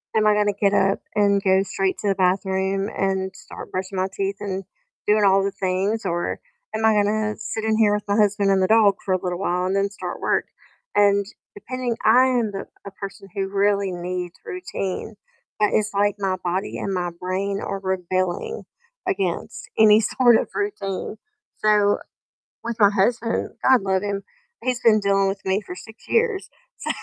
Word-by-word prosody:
"Am 215 -1 +3
I 210 - +5
gonna 210 -1 +2
get 200 0 +1
up 195 0 +2 0.2
and 200 -1 +3
go 190 0 +4
straight 195 -1 -1
to 205 - -2
the 195 - +2
bathroom 190 +1 0
and 190 -1 -1
start - - -10
brushing 185 +1 -4
my 185 +1 +1
teeth 195 0 -2
and 195 -2 -4 0.4
doing 210 0 +4
all 195 0 +5
the 200 - 0
things, 195 +2 -1
or 175 -1 -2 0.3
am 220 0 0
I 220 - +5
gonna 210 +1 +1
sit 220 0 -4
in 220 0 +1
here 210 -2 +4
with 210 0 -2
my 200 - +1
husband 205 -1 +3
and 190 -1 +3
the 185 - +3
dog 215 -2 +5
for 190 - 0
a 185 - 0
little 180 -1 -3
while 180 -1 0
and 190 +1 0
then 200 0 +1
start 200 - -6
work?" - - +1 0.5
and 200 -1 +4 0.3
depending 245 +3 -4
I 245 +4 +6
am 240 -4 +1
the 195 - -5 0.2
a 200 - -5
person 195 0 -9
who 195 -1 -1
really 200 -1 +1
needs 180 0 -4
routine, 185 +3 -4 0.4
but 210 - +4
it's 215 -1 +1
like 205 0 +2
my 190 -2 -1
body 185 +2 -2
and 195 - -3
my 180 -1 -1
brain 195 +2 -2
are 195 - -3
rebelling 185 - -2 0.4
against 400 +5 -2
any 215 -1 +7
sort 240 +2 +4
of - - -2
routine 215 - -3 0.5
so 205 -1 +4 0.7
with 235 -1 -3
my 205 -2 +7
husband, 230 +3 0
I 260 0 +7
love 195 -2 -1
him, 200 -1 -2 0.4
he's 250 -1 0
been 220 -3 +5
dealing 195 -1 +2
with 195 0 -3
me 190 +2 +1
for 180 - -7
6 220 +5 -13
years, 455 -4 +1 0.3
so - - -5
200 Hz, 185 wpm, -23 LUFS, 190-215 Hz, 0.7 s, any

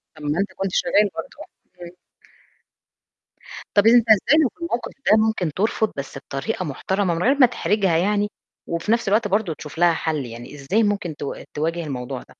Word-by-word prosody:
طَب 155 - -12
ما 150 +4 -1
أنت 200 - -1
كنت 195 -1 -2
شغّال 210 -1 +2
برضه، 165 - -7 0.4
إمم. 170 - -8 1.9
طَب 205 +2 +6
أنت 235 0 +6
إزاي 280 +8 +5
في - - -25
الموقِف 245 -8 -3 0.2
ده 215 - +7
ممكن 215 -7 +1
ترفض 215 +2 0
بس 135 -1 -6
بطريقة 140 +9 -4
محترمة 185 +5 -1
من 165 +2 -2
غير 270 +3 +4
ما 265 - +8
تحرجها 200 -7 +1
يعني، 205 +3 +1 0.4
وفي 170 +5 -2
نفْس 230 -2 +1
الوقت 210 +2 +2
برضه 200 -4 0
تشوف 150 +1 -11
لها 175 0 +4
حَل 155 -4 -2
يعني؟ 120 +4 -9
إزاي 165 +11 0
ممكن 200 -6 -1
ت 145 - -8 0.3
تواجه 165 +3 -2
الموضوع 130 -2 -5
ده؟ - - -14
190 Hz, 180 wpm, -22 LUFS, 155-215 Hz, 1.9 s, ما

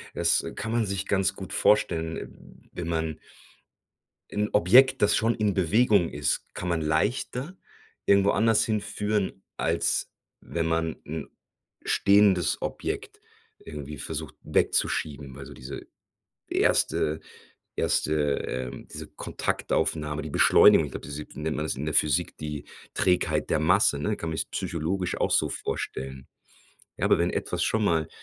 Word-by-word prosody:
Das - - +3
kann 115 - -4
man 115 -1 +1
sich 100 0 -2
ganz 95 -1 +1
gut 95 -7 -8
vorstellen, 80 -6 -1
wenn 85 -2 -5
man 80 -2 -2 1.1
'N 105 +1 -1
Objekt, 130 +7 +5
das 105 - +4
schon 115 +1 +2
in 105 -3 0
Bewegung 100 0 +3
ist, 70 -4 -1
kann 90 - -4
man 85 -2 0
leichter 120 - -1 0.5
irgendwo 100 0 +5
anders 110 +1 +3
hinführen, 105 -2 -2
als - - 0 0.3
wenn 85 -1 -3
man 80 -1 0
'n 80 +2 -5 0.6
stehendes 100 -3 +3
Objekt - - -4 0.4
irgendwie 75 -2 -8
versucht, - - -5
wegzuschieben, 70 -3 0
also 70 +1 -9
diese 65 +2 -8 0.6
erste 75 +1 +1 0.6
erste 75 - +1 0.3
ähm 65 0 -5
diese - - -7
Kontaktaufnahme, 75 -1 -2
die 75 - -6
Beschleunigung, - - +6
ich - - -11
glaube - - -7
diese 75 +1 -6
nennt 75 0 -3
man 75 - -2
das 75 - -2
in 70 - -4
der 75 - -1
Physik, 75 -4 +2
die 75 -1 -5 0.3
Trägheit 90 -1 +1
der - - +3
Masse, 80 -2 +3
ne? 105 +8 -1
Kann 85 - -4
man 80 - -3
jetzt - - -3
psychologisch 85 +3 -2
auch - - +1
so - - +3
vorstellen. 65 0 -5 0.7
Ja, - - 0
aber - - +4
wenn - - +1
etwas - - -2
schon 110 -1 +1
mal 80 -5 +1
85 Hz, 140 wpm, -26 LUFS, 75-105 Hz, 1.1 s, Beschleunigung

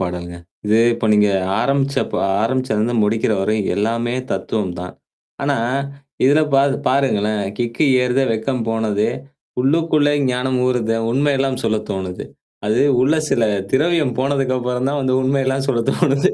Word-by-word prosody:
பாடல்ங்க. 90 -1 -4 0.3
இது 110 +2 +3 0.2
இப்ப 115 - -2
நீங்க 105 0 +4 0.3
ஆரம்பிச்சப்ப 140 0 0 0.3
ஆரம்பிச்சத 130 -2 0
வந்து 120 +2 -1
முடிக்கிற 110 +1 +1
வரைையும் 105 0 0
எல்லாமே 115 +3 -1 0.2
தத்துவம் 95 -1 -2
தான். 90 0 -7 0.5
ஆனா, 140 0 +1 0.7
இதில 145 +4 +5
பா 135 - +5 0.3
பாருங்களேன், 110 -6 +1 0.2
கிக்கு 120 +5 0 0.2
ஏறுத 125 +1 +1
வெக்கம் 115 +2 -2
போனது, 110 -2 0 0.5
உள்ளுக்குள்ளே 150 +1 +2 0.2
ஞானம் 125 +1 -1
ஊறுதே, 115 -3 0
உண்மையெல்லாம் 135 -1 0
சொல்ல 110 -1 +1
தோணுதே. 95 -2 -5 0.4
அது 110 +3 +2 0.2
உள்ள 135 +5 +3 0.2
சில 120 - +2 0.3
திரவியம் 150 -2 +1
போனதுக்கப்புறம் 130 -2 -1
தான் 145 0 -1
வந்து 130 -1 +1
உண்மையெல்லாம் 135 0 0
சொல்ல 120 -4 +1
தோணது. 140 -5 +2
125 Hz, 130 wpm, -19 LUFS, 110-135 Hz, 0.7 s, இதில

